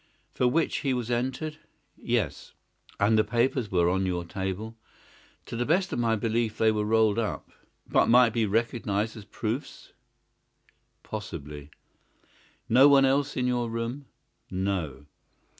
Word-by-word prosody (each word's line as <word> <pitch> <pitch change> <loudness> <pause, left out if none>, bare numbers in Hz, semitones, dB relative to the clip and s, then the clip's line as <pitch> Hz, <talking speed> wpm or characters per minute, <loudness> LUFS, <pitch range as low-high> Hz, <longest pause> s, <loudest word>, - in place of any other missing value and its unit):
"For 125 - +2
which 160 +6 +1
he 135 -3 0
was 120 -1 -3
entered?" 130 +6 -2 0.4
"Yes." - - -2 0.5
"And 110 +2 +4
the - - +5
papers 120 -1 0
were 85 -2 +3
on 95 +1 +1
your 90 -1 -2
table?" 95 +5 -4 0.7
"To - - -7
the 120 - 0
best 180 +8 +1
of - - -2
my 115 -1 +2
belief 110 0 -1
they 110 0 +4
were 105 -1 -1
rolled 110 0 +3
up." 95 -10 -4 0.4
"But - - +3
might 120 -1 +6
be 110 -2 +1
recognised 110 -1 -1
as 105 -3 -10
proofs?" 115 +7 -5 1.1
"Possibly." 75 -8 -7 1.0
"No 130 +5 +7
one 140 -1 +6
else 140 +2 +1
in 125 - 0
your 120 -2 0
room?" 115 +5 -4 0.4
"No." 90 -8 -3
115 Hz, 140 wpm, -27 LUFS, 100-125 Hz, 1.1 s, No